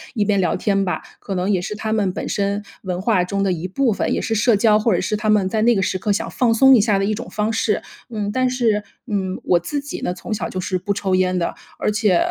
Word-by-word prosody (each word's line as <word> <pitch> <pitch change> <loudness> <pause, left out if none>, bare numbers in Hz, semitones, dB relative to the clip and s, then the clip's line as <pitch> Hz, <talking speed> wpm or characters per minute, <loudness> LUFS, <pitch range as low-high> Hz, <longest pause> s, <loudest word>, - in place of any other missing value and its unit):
一 210 -3 +1
边 200 -2 +2
聊 175 - +1
天 195 -1 +1
吧。 180 - -2 0.2
可 195 - -5
能 185 +2 -1
也 185 -3 +2
是 210 - -4
他 220 0 -2
们 200 -4 +1
本 - - -5
身 200 0 -1 0.2
文 180 -2 -3
化 190 -3 +2
中 200 +2 -2
的 195 -2 +1
一 175 +2 -4
部 240 +2 +1
分， - - -1
也 - - 0
是 225 - -1
社 215 0 +3
交 210 0 +4
或 215 -1 +2
者 175 - +1
是 200 +3 -1
他 215 +1 -2
们 205 -3 +3
在 215 +2 0
那 240 +1 +5
个 195 - +1
时 185 - 0
刻 205 +2 -1
想 200 - -1
放 240 -3 +2
松 265 +3 +7
一 220 - +5
下 205 -2 +2
的 195 - +1
一 215 - 0
种 - - -6
方 215 +1 -1
式。 220 -2 0 0.3
嗯， 210 -3 -3
但 255 0 +2
是， 225 -5 +1 0.2
嗯， 190 -3 -2
我 175 - +4
自 285 - -3
己 280 0 -7
呢， 180 - -1
从 200 +4 -6
小 185 -6 -3
就 185 - -4
是 185 0 -1
不 190 +3 -4
抽 190 -2 0
烟 185 0 +1
的。 170 - -2 0.2
而 - - 0
且， 210 -4 +2
205 Hz, 300 characters per minute, -20 LUFS, 185-220 Hz, 0.3 s, 松